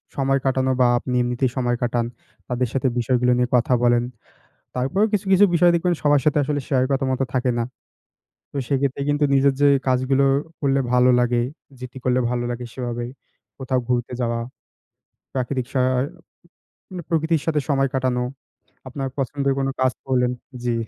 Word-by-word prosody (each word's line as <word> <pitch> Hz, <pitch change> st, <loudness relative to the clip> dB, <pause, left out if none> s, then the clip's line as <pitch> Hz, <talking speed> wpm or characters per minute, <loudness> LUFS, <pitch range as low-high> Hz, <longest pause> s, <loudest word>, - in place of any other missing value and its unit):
সময় 135 Hz, 0 st, +1 dB
কাটানো 130 Hz, 0 st, +1 dB
বা 125 Hz, -, +6 dB
আপনি 125 Hz, -, -5 dB
এমনিতেই 125 Hz, +1 st, 0 dB
সময় 120 Hz, -1 st, +1 dB
কাটান, 120 Hz, -1 st, 0 dB, 0.4 s
তাদের 125 Hz, -1 st, -1 dB
সাথে 135 Hz, 0 st, +1 dB
বিষয়গুলো 125 Hz, +1 st, +2 dB
নিয়ে 125 Hz, 0 st, +1 dB
কথা 125 Hz, +1 st, +2 dB
বলেন। 120 Hz, 0 st, +4 dB, 0.7 s
তারপরও 135 Hz, +12 st, +1 dB
কিছু, 200 Hz, -1 st, 0 dB
কিছু, 190 Hz, +2 st, +7 dB
বিষয় 175 Hz, +1 st, +5 dB
দেখবেন 175 Hz, +1 st, +1 dB
সবার 145 Hz, -1 st, +4 dB
সাথে 150 Hz, -1 st, +3 dB
আসলে 145 Hz, 0 st, -1 dB
শেয়ার 130 Hz, -2 st, +2 dB
করার 135 Hz, -1 st, 0 dB
মতো 130 Hz, +1 st, 0 dB
থাকে 125 Hz, 0 st, +1 dB
না। 115 Hz, -, +1 dB, 0.9 s
তো -, -, -17 dB
সেক্ষেত্রে 140 Hz, 0 st, 0 dB
কিন্তু 145 Hz, +1 st, +1 dB
নিজের 135 Hz, 0 st, +4 dB
যে 145 Hz, -, +6 dB, 0.2 s
কাজগুলো 130 Hz, +1 st, +2 dB, 0.4 s
করলে 140 Hz, -1 st, +2 dB
ভালো 125 Hz, 0 st, +5 dB
লাগে, 120 Hz, 0 st, +2 dB, 0.4 s
যেটি 125 Hz, +1 st, -9 dB
করলে 125 Hz, 0 st, +2 dB
ভালো 120 Hz, 0 st, -1 dB
লাগে 120 Hz, +1 st, -5 dB
সেভাবে। 120 Hz, -2 st, -4 dB, 0.5 s
কোথাও 130 Hz, -1 st, -1 dB
ঘুরতে 125 Hz, 0 st, -1 dB
যাওয়া, 115 Hz, -1 st, -1 dB, 1.0 s
প্রাকৃতিক 130 Hz, -1 st, -2 dB
সা 130 Hz, -, +1 dB, 1.1 s
মানে 180 Hz, -2 st, -6 dB
প্রকৃতির 160 Hz, -1 st, +1 dB
সাথে 155 Hz, -2 st, +1 dB
সময় 135 Hz, -1 st, +2 dB
কাটানো, 130 Hz, -2 st, 0 dB, 0.7 s
আপনার 135 Hz, +1 st, -4 dB
পছন্দের 140 Hz, +1 st, 0 dB
কোন 135 Hz, 0 st, 0 dB
কাজ 130 Hz, 0 st, +3 dB
করলেন। 125 Hz, -1 st, +1 dB, 0.3 s
জি। 120 Hz, -1 st, +1 dB
130 Hz, 160 wpm, -22 LUFS, 125-140 Hz, 1.1 s, কিছু